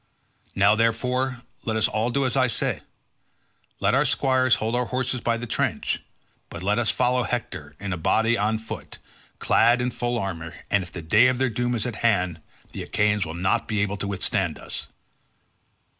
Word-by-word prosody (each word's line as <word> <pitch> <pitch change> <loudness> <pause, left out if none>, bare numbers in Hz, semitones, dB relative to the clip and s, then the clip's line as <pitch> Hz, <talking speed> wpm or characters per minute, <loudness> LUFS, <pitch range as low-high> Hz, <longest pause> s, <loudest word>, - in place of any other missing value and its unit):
Now, 100 +2 +5
therefore, 125 +3 0 0.2
let 110 -1 -1
us 110 - +3
all 110 +3 0
do 140 +2 +1
as 130 - 0
I 130 -1 +4
say; 115 - -1 1.0
let - - +2
our - - +4
squires 130 -2 +3
hold 110 +1 -2
our 125 0 +1
horses 125 0 -1
by 115 -1 +1
the 120 - -5
trench, - - -1 0.5
but 85 - -8
let 105 +4 +2
us 115 -3 +1
follow 125 0 +2
Hector 120 -1 -4
in 100 -2 -3
a - - -3
body 115 +8 +2
on 110 +1 +1
foot, 110 0 -8 0.4
clad 120 +2 +4
in 125 +1 0
full 120 0 -2
armour, 85 -6 -4 0.2
and 100 - +3
if 90 -2 -8
the 85 - -7
day 105 +10 +5
of 130 -1 +1
their 130 -1 +1
doom 120 +2 -1
is 110 - -1
at 125 - -4
hand 90 -7 +1 0.3
the - - -6
Achaeans 105 -3 +1
will 80 - -6
not 95 +2 0
be 105 -2 0
able 100 0 -2
to 100 - -3
withstand 100 -2 0
us." - - -7
115 Hz, 190 wpm, -24 LUFS, 100-125 Hz, 1.0 s, Now